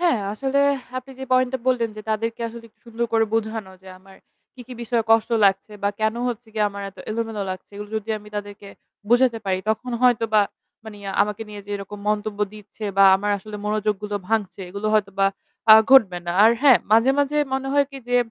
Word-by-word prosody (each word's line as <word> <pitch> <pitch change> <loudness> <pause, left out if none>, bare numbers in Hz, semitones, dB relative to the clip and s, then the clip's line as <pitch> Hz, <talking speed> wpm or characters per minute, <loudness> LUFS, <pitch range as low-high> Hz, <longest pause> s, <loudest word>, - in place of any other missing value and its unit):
হ্যাঁ, 345 -9 +2
আসলে 270 +5 -1 0.4
আপনি 255 +1 -11
যে 265 - -5
পয়েন্ট 255 -1 +3
টা - - 0
বললেন 240 -3 +1
যে 215 - -7
তাদেরকে 225 +2 -2
আসলে 230 0 -11
একটু 220 - -39
সুন্দর 235 +1 -3
করে 225 0 +4
বোঝানো 220 -3 -2
যে 190 - -13
আমার 190 +1 -18 0.4
কি, 260 - -13
কি 255 - -9
বিষয়ে 235 0 0
কষ্ট 225 0 +4
লাগছে, 195 +2 +2
বা 200 - +2
কেন 220 0 +1
হচ্ছে 240 0 -5
গিয়ে 215 -1 +1
আমার 200 0 -7
এত 195 - -24
এলোমেলো 225 -1 -3
লাগছে 185 0 -8
এগুলো 210 0 -7
যদি 215 0 -5
আমি 210 0 -14
তাদেরকে 205 0 -7 0.4
বুঝাতে 240 0 +3
পারি। 190 -1 +1
তখন 250 +3 -3
হয়তোবা 225 -3 +3 0.4
মানি, 215 -2 -10 0.2
আমাকে 210 +2 -3
নিয়ে 210 -1 -8
যে - - -10
এরকম 200 +1 -8
মন্তব্য 210 0 -1
দিচ্ছে 215 +1 -11
বা 195 - +7
আমার 205 +2 -2
আসলে 210 +2 -9
মনোযোগগুলো 210 -1 -1
ভাঙছে 210 -3 -1
এগুলো 200 +3 -4
হয়তোবা 200 -2 +1 0.5
আ - - +12 0.2
ঘটবে 205 -10 +6
না। - - -1
আর 225 - +7
হ্যাঁ, 270 -4 +7
মাঝে, 230 +4 +5
মাঝে 285 +1 +1 0.2
মনে 270 0 -2
হয় 285 0 +3
কি 275 - -8
যে 245 - +2
220 Hz, 205 wpm, -22 LUFS, 205-235 Hz, 0.5 s, আ